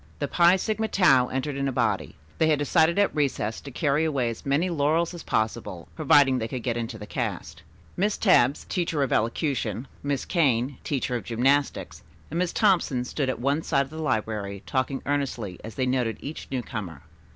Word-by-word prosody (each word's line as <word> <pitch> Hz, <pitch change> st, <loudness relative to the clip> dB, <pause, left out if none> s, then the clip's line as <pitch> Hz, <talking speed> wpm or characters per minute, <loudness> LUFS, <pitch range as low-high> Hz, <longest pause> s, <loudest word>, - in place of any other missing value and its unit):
The 145 Hz, -, -2 dB
Phi 175 Hz, +4 st, +5 dB
Sigma 220 Hz, +3 st, -1 dB
Tau 135 Hz, -12 st, +4 dB
entered 135 Hz, +3 st, -3 dB
in 140 Hz, 0 st, -1 dB
a -, -, 0 dB
body. 115 Hz, -6 st, -1 dB, 0.2 s
They 160 Hz, -, +4 dB
had 155 Hz, -1 st, +3 dB
decided 160 Hz, +4 st, +2 dB
at 200 Hz, -4 st, +2 dB
recess 135 Hz, -7 st, -1 dB
to 140 Hz, -, -9 dB
carry 145 Hz, +2 st, +1 dB
away 135 Hz, -7 st, 0 dB
as 115 Hz, -, -9 dB
many 145 Hz, +6 st, +2 dB
laurels 165 Hz, +1 st, +1 dB
as 170 Hz, -, -7 dB
possible, 110 Hz, -5 st, -2 dB
providing 135 Hz, -3 st, +4 dB
they 110 Hz, -, -2 dB
could 125 Hz, 0 st, -5 dB
get 120 Hz, -2 st, -1 dB
into 115 Hz, -1 st, -4 dB
the 105 Hz, -, -8 dB
cast. -, -, -4 dB, 0.3 s
Miss 205 Hz, +3 st, 0 dB
Tebbs, 145 Hz, -, +3 dB
teacher 165 Hz, -5 st, 0 dB
of 135 Hz, -, -1 dB
elocution; 125 Hz, +2 st, -1 dB
Miss 140 Hz, -2 st, -2 dB
Kane, 135 Hz, -6 st, +1 dB
teacher 130 Hz, -3 st, -1 dB
of 120 Hz, -, -3 dB
gymnastics, 135 Hz, +7 st, 0 dB, 0.3 s
and 165 Hz, -, -1 dB
Miss 180 Hz, -1 st, 0 dB
Thompson 170 Hz, -, +2 dB
stood 135 Hz, +1 st, -2 dB
at 130 Hz, -, -2 dB
one 140 Hz, +5 st, +1 dB
side 140 Hz, -3 st, +1 dB
of 135 Hz, -, -17 dB
the 160 Hz, 0 st, -6 dB
library 105 Hz, -7 st, -2 dB
talking 135 Hz, 0 st, -1 dB
earnestly 130 Hz, -10 st, -2 dB
as 110 Hz, -, -8 dB
they 130 Hz, -, 0 dB
noted 125 Hz, -4 st, 0 dB
each 150 Hz, +3 st, -7 dB
newcomer. 105 Hz, -, -5 dB
140 Hz, 190 wpm, -26 LUFS, 120-155 Hz, 0.3 s, Phi